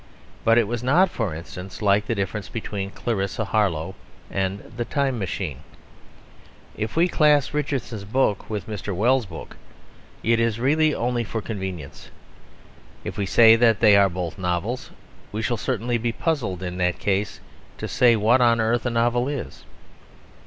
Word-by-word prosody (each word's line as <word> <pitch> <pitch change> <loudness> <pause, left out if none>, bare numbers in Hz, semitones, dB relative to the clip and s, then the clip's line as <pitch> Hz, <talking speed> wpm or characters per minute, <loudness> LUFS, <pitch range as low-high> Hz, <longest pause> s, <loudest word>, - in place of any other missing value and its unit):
But 115 +1 +4
it 115 -3 +3
was 120 +1 -3
not 170 +9 +3
(for 105 -9 -2
instance) 90 +3 -8
like 100 0 +2
the 115 - 0
difference 100 0 -3
between 100 -3 -4
Clarissa 105 0 -2
Harlowe 95 -5 0 0.4
and 95 +2 -3
The 120 - -1
Time 135 -1 -1
Machine. 90 -7 -4 1.2
If 110 +1 -4
we 170 +2 +4
class 150 -5 +3
Richardson's 130 -7 -2
book 105 -1 0
with 105 -2 -3
Mr. 105 -2 -5
Wells's 120 +4 +2
book - - -10 0.7
it 115 +1 +3
is 115 -1 0
really 155 +4 +2
only 120 0 -1
for 115 +1 -4
convenience; 95 -10 -6 0.9
if - - -5
we 100 - -2
say 110 +4 +7
that 115 -2 +4
they 105 -3 +6
are 100 -1 +5
both 90 +1 -5
novels 90 +7 -2 0.4
we 110 +2 -3
shall 120 +3 0
certainly 120 +2 -1
be 120 +1 -1
puzzled 115 - -2
in 90 0 -4
that 90 -1 +1
case 100 -3 -1 0.4
to - - -5
say 120 -2 +4
what 115 +4 +3
on 115 -1 +4
earth 115 +2 +1
a - - +1
novel 120 +1 +1
is. 135 - -6
110 Hz, 160 wpm, -23 LUFS, 95-120 Hz, 1.2 s, say